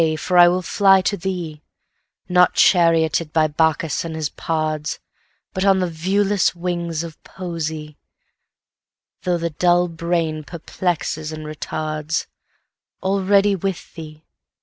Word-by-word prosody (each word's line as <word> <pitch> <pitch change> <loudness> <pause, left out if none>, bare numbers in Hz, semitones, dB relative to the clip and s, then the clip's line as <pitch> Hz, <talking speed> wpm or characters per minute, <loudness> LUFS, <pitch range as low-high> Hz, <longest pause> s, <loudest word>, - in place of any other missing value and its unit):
for 180 - -2
I 175 - +9
will 180 +1 +1
fly 195 +1 +4
to 200 - 0
thee, 175 -5 -5 0.7
Not 180 0 +4
charioted 165 -3 +3
by 160 0 +3
Bacchus 160 0 0
and 165 -1 -5
his 155 -2 -2
pards, 155 -1 -2 0.6
But 190 - -2
on 195 -1 +4
the 185 - +1
viewless 195 +4 +1
wings 170 -2 -3
of 165 -2 -10
Poesy, 160 -4 -6 1.2
Though 180 -1 0
the 170 0 -3
dull 175 +3 +3
brain 165 -2 -2
perplexes 160 -1 -3
and 155 0 -7
retards:Already 165 +6 -2
with 190 -1 -4
thee! 155 -1 -10
170 Hz, 120 wpm, -21 LUFS, 155-180 Hz, 1.2 s, I